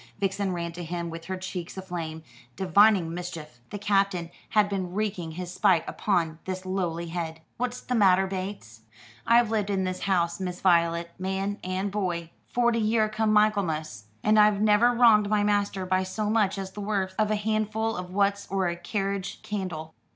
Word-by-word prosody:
Vixen 195 Hz, 0 st, 0 dB
ran 170 Hz, -1 st, -3 dB
to 175 Hz, +1 st, -7 dB
him 170 Hz, 0 st, -4 dB
with 165 Hz, 0 st, -8 dB
her 185 Hz, 0 st, -4 dB
cheeks 185 Hz, -1 st, -6 dB
aflame, 170 Hz, -4 st, -5 dB, 0.3 s
divining 190 Hz, -3 st, +4 dB
mischief. 165 Hz, -6 st, -7 dB
The 205 Hz, -, -5 dB
Captain 195 Hz, -4 st, +1 dB, 0.2 s
had 210 Hz, -1 st, +3 dB
been 190 Hz, -3 st, -3 dB
wreaking 195 Hz, -6 st, -2 dB
his 180 Hz, +1 st, -6 dB
spite 185 Hz, -4 st, +3 dB
upon 165 Hz, -6 st, 0 dB
this 185 Hz, 0 st, -4 dB
lowly 175 Hz, -3 st, -2 dB
head. 165 Hz, -1 st, -4 dB, 0.2 s
"What's 250 Hz, +1 st, -3 dB
the 250 Hz, -, -4 dB
matter, 195 Hz, -4 st, +5 dB
Bates?" 185 Hz, -, -6 dB, 0.5 s
"I've 235 Hz, -1 st, +5 dB
lived 210 Hz, -2 st, 0 dB
in 195 Hz, -2 st, 0 dB
this 185 Hz, 0 st, -2 dB
house, 175 Hz, -3 st, 0 dB
Miss 180 Hz, -1 st, -4 dB
Voylet, 170 Hz, -2 st, +2 dB
man 190 Hz, +2 st, -2 dB
and 185 Hz, +2 st, -2 dB
boy, 175 Hz, -5 st, -2 dB, 0.2 s
forty 240 Hz, -1 st, +2 dB
year 215 Hz, 0 st, +2 dB
come 215 Hz, 0 st, 0 dB
Michaelmas, 175 Hz, -, +1 dB, 0.2 s
and 215 Hz, 0 st, +4 dB
I've 210 Hz, -1 st, +5 dB
never 215 Hz, +3 st, +5 dB
wronged 225 Hz, -4 st, +5 dB
my 210 Hz, -1 st, +2 dB
master 205 Hz, -2 st, 0 dB
by 185 Hz, 0 st, +1 dB
so 210 Hz, +3 st, -2 dB
much 210 Hz, -3 st, +2 dB
as 190 Hz, -1 st, -5 dB
the 205 Hz, -, -7 dB
worth 200 Hz, -2 st, -1 dB
of 215 Hz, -1 st, +2 dB
a 215 Hz, -, +2 dB
handful 215 Hz, +1 st, -1 dB
o' 180 Hz, -, -3 dB
wuts 200 Hz, +2 st, 0 dB
or 190 Hz, -1 st, 0 dB
a 170 Hz, -, -3 dB
carriage 195 Hz, +2 st, -3 dB
candle. 175 Hz, -6 st, -4 dB
190 Hz, 180 wpm, -27 LUFS, 175-210 Hz, 0.5 s, matter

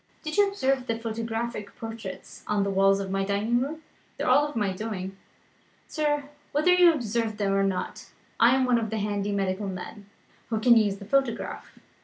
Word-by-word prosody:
Did 310 Hz, -, -4 dB
you 410 Hz, 0 st, +5 dB
observe 270 Hz, -10 st, 0 dB
the 230 Hz, -, -1 dB
photographic 225 Hz, -1 st, -4 dB
portraits 225 Hz, -4 st, -8 dB
on 210 Hz, -1 st, +1 dB
the 200 Hz, -, -1 dB
walls 195 Hz, 0 st, +4 dB
of 195 Hz, -1 st, -4 dB
my 195 Hz, 0 st, 0 dB
dining 210 Hz, +5 st, +1 dB
room? 310 Hz, +4 st, -4 dB, 0.3 s
They -, -, -3 dB
are 285 Hz, +4 st, +4 dB
of 295 Hz, -, -11 dB
my 205 Hz, -4 st, 0 dB
doing, 195 Hz, -2 st, -5 dB, 0.7 s
sir 295 Hz, -2 st, 0 dB, 0.3 s
whether 305 Hz, +5 st, +4 dB
you 360 Hz, -1 st, +7 dB
observed 230 Hz, -6 st, -2 dB
them 200 Hz, -2 st, 0 dB
or 195 Hz, -, +2 dB
not 195 Hz, -2 st, -2 dB, 0.3 s
I 240 Hz, +2 st, +6 dB
am 265 Hz, -1 st, +2 dB
one 245 Hz, -2 st, +3 dB
of 220 Hz, -1 st, -3 dB
the 220 Hz, -, -2 dB
handy 205 Hz, -1 st, -1 dB
medical 195 Hz, 0 st, -1 dB
men, 195 Hz, +2 st, -7 dB, 0.4 s
who 220 Hz, -2 st, 0 dB
can 235 Hz, +2 st, +6 dB
use 210 Hz, -3 st, +3 dB
the 200 Hz, -, -10 dB
photograph. 270 Hz, +1 st, -1 dB
225 Hz, 190 wpm, -27 LUFS, 200-255 Hz, 0.7 s, you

